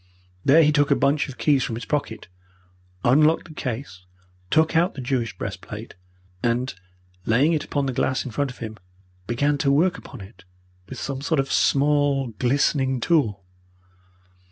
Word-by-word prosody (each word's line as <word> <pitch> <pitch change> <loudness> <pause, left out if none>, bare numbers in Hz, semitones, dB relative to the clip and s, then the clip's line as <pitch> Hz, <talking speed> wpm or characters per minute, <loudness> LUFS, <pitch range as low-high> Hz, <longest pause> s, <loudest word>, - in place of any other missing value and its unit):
There 160 +4 +6
he 150 - +4
took 145 -2 +2
a - - +4
bunch 140 +1 +1
of 130 - -9
keys 140 -3 +2
from 115 - -3
his 115 - -6
pocket, 145 -7 -3 0.8
unlocked 155 +7 +3
the - - -10
case, 110 -10 -6 0.4
took 160 +1 +2
out 170 +3 +2
the - - -7
Jewish 120 -3 -2
breastplate, 105 +3 -7 0.5
and, 120 +1 0 0.5
laying 135 +9 +3
it 155 - 0
upon 145 -1 -2
the 135 - -2
glass 130 +1 0
in 130 - -5
front 140 +5 -1
of 125 - -10
him, 110 -2 -7 0.5
began 140 +5 0
to 140 - +2
work 170 +6 +2
upon 130 -6 -11
it 95 0 -14 0.5
with 130 - -7
some 135 -1 -4
sort 150 +1 0
of 135 0 -1
small, 145 -2 +2
glistening 135 0 +1
tool. 115 - +1
135 Hz, 165 wpm, -23 LUFS, 120-145 Hz, 0.8 s, There